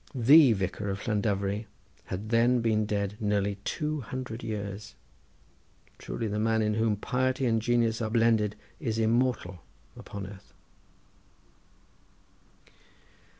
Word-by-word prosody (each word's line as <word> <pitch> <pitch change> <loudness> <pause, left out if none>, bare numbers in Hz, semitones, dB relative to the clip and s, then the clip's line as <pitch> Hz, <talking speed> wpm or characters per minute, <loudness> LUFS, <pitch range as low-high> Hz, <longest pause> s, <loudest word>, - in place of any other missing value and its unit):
The 135 +2 +7
Vicar 100 +1 -3
of 100 +1 -3
Llandovery 105 -1 -1 0.4
had 100 +4 -5
then 120 +2 +4
been 110 -2 +1
dead 100 -1 -2
nearly 100 -2 0
two 155 +3 -2
hundred 125 -1 -6
years. 100 -1 -5 1.0
Truly 115 - -4
the 105 0 -2
man 110 0 +2
in 105 0 +1
whom 110 0 +1
piety 130 +5 -1
and 115 -2 +2
genius 115 -1 +1
are 110 - -1
blended 115 -2 +2 0.2
is 115 -7 -2
immortal 115 -5 +1 0.4
upon 100 -1 -7
earth. 95 0 -12
110 Hz, 115 wpm, -28 LUFS, 105-120 Hz, 1.0 s, The